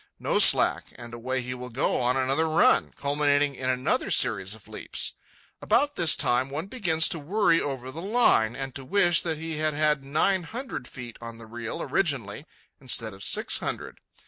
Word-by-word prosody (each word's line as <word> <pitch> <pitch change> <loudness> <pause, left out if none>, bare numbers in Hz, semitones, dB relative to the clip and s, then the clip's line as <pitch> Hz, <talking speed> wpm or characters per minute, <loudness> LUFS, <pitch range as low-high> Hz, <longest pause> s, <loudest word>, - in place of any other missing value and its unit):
No - - 0
slack, - - +5
and 120 0 -11
away 130 +2 -3
he 125 +1 -5
will 125 0 -8
go 125 +4 -1
on 125 +1 +1
another 135 +5 +1
run, 155 - +3
culminating 145 0 +1
in 130 -1 -4
another 130 - -1
series - - +2
of - - -18
leaps. - - -3 0.5
About 290 0 +1
this 165 -4 +4
time 125 +2 0
one 150 +5 -4
begins 175 -8 +1
to 165 - -2
worry 165 +1 +1
over 130 -2 -5
the 160 +5 -8
line, 195 - +3
and 135 -1 -6
to 135 - -9
wish 175 +1 +3
that 160 -3 -3
he 160 0 -5
had 155 -1 -1
had 150 -2 +1
nine 155 +7 +1
hundred 225 - -7
feet 120 -3 -10
on 115 -1 -9
the 115 - -12
reel 115 0 -6
originally 140 - -2 0.3
instead 115 -5 +1
of 95 - -11
six - - 0
hundred. - - -6
140 Hz, 185 wpm, -26 LUFS, 125-165 Hz, 0.5 s, slack